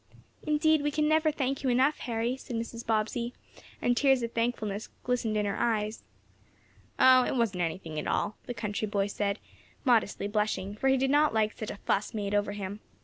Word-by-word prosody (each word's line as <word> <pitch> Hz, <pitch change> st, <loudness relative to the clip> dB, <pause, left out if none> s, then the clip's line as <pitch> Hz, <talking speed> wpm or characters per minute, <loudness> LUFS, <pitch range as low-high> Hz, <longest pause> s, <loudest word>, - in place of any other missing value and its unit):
"Indeed 310 Hz, 0 st, +3 dB
we 295 Hz, -, +1 dB
never 310 Hz, +1 st, +3 dB
can 300 Hz, -, -21 dB
thank 270 Hz, 0 st, -1 dB
you 270 Hz, -, 0 dB
enough. 260 Hz, +5 st, +3 dB
Harry," 235 Hz, +1 st, -1 dB
said 265 Hz, -2 st, -7 dB
Mrs. 230 Hz, 0 st, -4 dB
Bobbsey, 225 Hz, +2 st, -1 dB, 0.5 s
and 245 Hz, -, +3 dB
tears 270 Hz, -2 st, +3 dB
of 230 Hz, -, -3 dB
thankfulness 225 Hz, -3 st, -2 dB
glistened 240 Hz, -3 st, 0 dB
in 210 Hz, -, +1 dB
her 200 Hz, -, -2 dB
eyes. 220 Hz, -2 st, 0 dB, 1.0 s
"Oh, 255 Hz, 0 st, +7 dB
it -, -, -1 dB
wasn't 220 Hz, -7 st, 0 dB
anything 160 Hz, -2 st, -3 dB
at -, -, -4 dB
all," 210 Hz, -, 0 dB
the 245 Hz, -, -4 dB
country 210 Hz, -1 st, -2 dB
boy 200 Hz, -1 st, 0 dB
said, 205 Hz, 0 st, -1 dB, 0.5 s
modestly 225 Hz, -5 st, +2 dB
blushing, 205 Hz, -2 st, -1 dB
for 270 Hz, -, -1 dB
he 265 Hz, 0 st, +4 dB
did 265 Hz, +1 st, +1 dB
not 295 Hz, -3 st, +4 dB
like 215 Hz, -1 st, +2 dB
such 215 Hz, -, -5 dB
a -, -, -6 dB
"fuss" 205 Hz, +2 st, 0 dB
made 205 Hz, -1 st, -2 dB
over 205 Hz, 0 st, +1 dB
him. 200 Hz, 0 st, -5 dB
230 Hz, 195 wpm, -29 LUFS, 205-260 Hz, 1.0 s, Oh